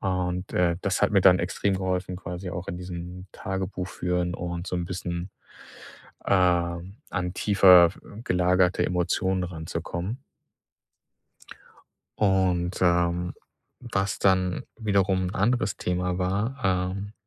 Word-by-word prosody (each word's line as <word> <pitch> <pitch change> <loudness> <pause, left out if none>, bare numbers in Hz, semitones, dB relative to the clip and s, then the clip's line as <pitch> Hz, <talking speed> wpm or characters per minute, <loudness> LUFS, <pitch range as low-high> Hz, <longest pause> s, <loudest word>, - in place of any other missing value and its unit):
Und, 90 -1 -2
äh, 85 -1 +2
das 95 -1 0
hat - - +4
mir 100 - +5
dann 90 -1 +6
extrem 95 +3 -1
geholfen 95 -1 -2
quasi 90 0 -6
auch 85 +1 -6
in 85 - -4
diesem 90 0 -7
Tagebuch 95 -1 -4
führen 90 -1 -1
und 85 +1 -4
so 90 - -2
'n 90 - -2
bisschen, 90 0 -4 1.0
ähm, 90 0 +1
an 90 0 -2
tiefer 90 -4 +6 0.3
gelagerte 90 0 +2
Emotionen 90 +1 0
ranzukommen. 85 +5 -5 2.0
Und, 95 -3 +1
ähm, 90 0 +2 0.6
was 95 -1 0
dann 95 -2 +2 0.2
wiederum 100 -4 +1
'n - - -7
anderes 105 -1 +1
Thema 90 0 -1
war, 105 +9 -2 0.3
ähm, 100 +1 -6
90 Hz, 120 wpm, -26 LUFS, 90-95 Hz, 2.0 s, dann